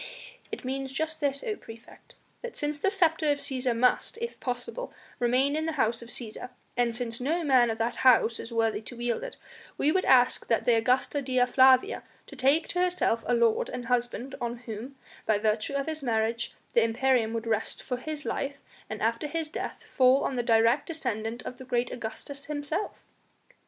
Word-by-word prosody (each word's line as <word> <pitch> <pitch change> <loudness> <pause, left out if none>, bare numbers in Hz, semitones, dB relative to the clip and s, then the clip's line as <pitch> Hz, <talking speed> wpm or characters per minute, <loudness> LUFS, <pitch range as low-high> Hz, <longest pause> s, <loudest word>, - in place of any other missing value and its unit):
"It - - -6
means 265 +1 -3
just 315 +3 -2
this, 280 -1 0
O 430 - -2
praefect! 225 - -14 0.3
that 485 -1 -6
since 295 0 -1
the 390 - +2
sceptre 330 -5 +2
of 290 - +2
Cæsar 255 -4 +1
must, 250 - +2
if 470 +1 -5
possible, 250 - -4 0.3
remain 255 +4 +2
in 315 +1 -1
the 325 - -1
House 230 -2 +1
of 235 - -10
Cæsar, 240 +1 -1 0.3
and 240 -2 +1
since 235 -1 -2
no 325 +6 0
man 255 -5 +4
of 225 - -2
that 230 +1 -1
House 240 -3 +4
is 230 - -6
worthy 225 -2 +1
to 240 +2 -10
wield 240 - -1
it, - - -7 0.4
we 295 - +2
would 375 +3 +1
ask 250 -1 +4
the 230 +1 +3
Augusta 250 +5 +1
Dea 255 -2 +2
Flavia 260 - +4 0.2
to 280 - -12
take 275 +5 +3
to 355 - 0
herself 360 -10 +1
a 245 - +3
lord 235 -2 +2
and 245 - -5
husband, 245 +2 -1
on 240 0 -2
whom, 230 +5 -7 0.3
by 215 - +3
virtue 215 +4 0
of 275 0 0
his 315 -1 -4
marriage, 230 -1 -1 0.2
the 235 - +5
imperium 230 0 +2
would 230 0 -3
rest 220 -1 -1
for 250 - -3
his 300 +3 -5
life, 280 0 -2 0.3
and 215 -1 -5
after 230 +6 0
his 325 0 -3
death - - -5
fall 260 +1 +3
on 265 - -1
the 245 - +1
direct 230 +2 +3
descendant 235 - -3
of 250 - -7
great 245 -1 0
Augustus 275 +5 -6
himself." 300 +6 -3
250 Hz, 190 wpm, -28 LUFS, 230-290 Hz, 0.4 s, the